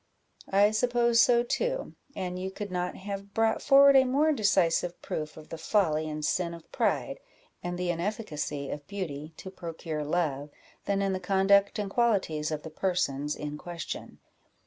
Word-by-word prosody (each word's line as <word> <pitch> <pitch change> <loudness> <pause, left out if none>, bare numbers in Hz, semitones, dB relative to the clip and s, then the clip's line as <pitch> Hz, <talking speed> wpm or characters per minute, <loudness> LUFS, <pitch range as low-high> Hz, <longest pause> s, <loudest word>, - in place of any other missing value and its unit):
"I 200 +2 +4
suppose 235 +1 +3
so 240 -1 +4
too, - - -2 0.2
and 180 -1 -4
you 190 +1 -3
could 200 0 -6
not 180 0 -2
have 200 +1 -7
brought 225 0 +2
forward 275 0 +7
a 265 - +8
more 280 +5 +2
decisive 180 - +2
proof 155 0 -4
of 155 - -12
the 165 - -7
folly 155 -7 +1
and 150 0 -3
sin 170 +1 0
of 165 - -15
pride, - - 0 0.4
and 175 0 -4
the 180 -1 0
inefficacy 165 -6 -3
of 145 -1 -7
beauty 160 -6 -5
to 190 - -8
procure 165 -4 -5
love, 150 -3 -1 0.4
than 200 0 +1
in 195 -1 0
the 185 - -2
conduct 195 +2 +3
and 205 -1 -2
qualities 195 -11 +1
of 155 -1 -4
the 160 - -8
persons 150 -5 -1
in 150 0 -6
question. 170 -3 -7
185 Hz, 170 wpm, -28 LUFS, 155-210 Hz, 0.4 s, a